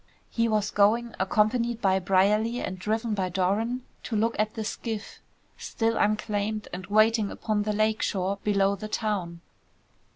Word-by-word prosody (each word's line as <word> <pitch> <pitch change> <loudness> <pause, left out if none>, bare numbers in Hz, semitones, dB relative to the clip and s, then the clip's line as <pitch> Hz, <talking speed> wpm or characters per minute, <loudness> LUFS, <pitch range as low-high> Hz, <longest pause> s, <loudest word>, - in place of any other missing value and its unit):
He 230 0 +1
was 215 -2 0
going, 225 +3 +2
accompanied 225 +4 +1
by 190 -3 +2
Brierly 205 +6 +2
and 185 0 -4
driven 220 +3 -1
by 190 -3 -1
Doran, 205 +7 0 0.2
to 230 - -4
look 225 +2 +1
at 215 0 0
the 220 - -3
skiff, 220 0 -5 0.4
still 225 0 -1
unclaimed 210 0 0
and 180 0 -6
waiting 215 0 +3
upon 215 -2 -1
the 210 +1 -1
lake 215 +1 +1
shore 195 +1 -1
below 200 -1 +2
the 215 +2 -7
town. 200 -6 -2
215 Hz, 155 wpm, -27 LUFS, 195-225 Hz, 0.4 s, waiting